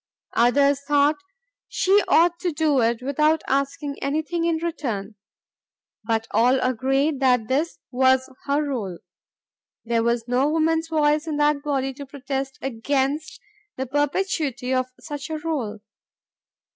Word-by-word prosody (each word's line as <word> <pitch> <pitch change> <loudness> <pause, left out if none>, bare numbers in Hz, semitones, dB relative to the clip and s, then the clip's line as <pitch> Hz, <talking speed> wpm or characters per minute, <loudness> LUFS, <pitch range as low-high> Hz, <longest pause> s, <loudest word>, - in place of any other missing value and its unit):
Others 280 +4 +3
thought 290 +1 +3 0.5
she 395 +2 +3
ought 340 +1 +4
to 355 -1 -1
do 300 -3 +2
it 235 +1 0
without 305 +4 +2
asking 280 +1 -2
anything 315 +4 -1
in 335 -1 +2
return. 270 -11 -3 0.9
But 225 0 0
all 245 +5 +3
agreed 270 +4 +1
that 250 -4 +3
this 295 +7 0
was 260 0 +3 0.2
her 285 +1 +1
role. 225 - -3 0.9
There 230 0 +1
was 235 0 0
no 255 +4 +2
woman's 320 +1 +1
voice 305 -1 +1
in 305 -2 -2
that 295 -1 +2
body 270 -2 -1
to 280 +1 -9
protest 270 0 -4
against 270 +4 -1 0.4
the 265 - -2
perpetuity 290 -2 -1
of 255 0 +1
such 290 +1 -7
a 315 - -2
rôle. 270 -10 -3
280 Hz, 135 wpm, -23 LUFS, 255-305 Hz, 0.9 s, ought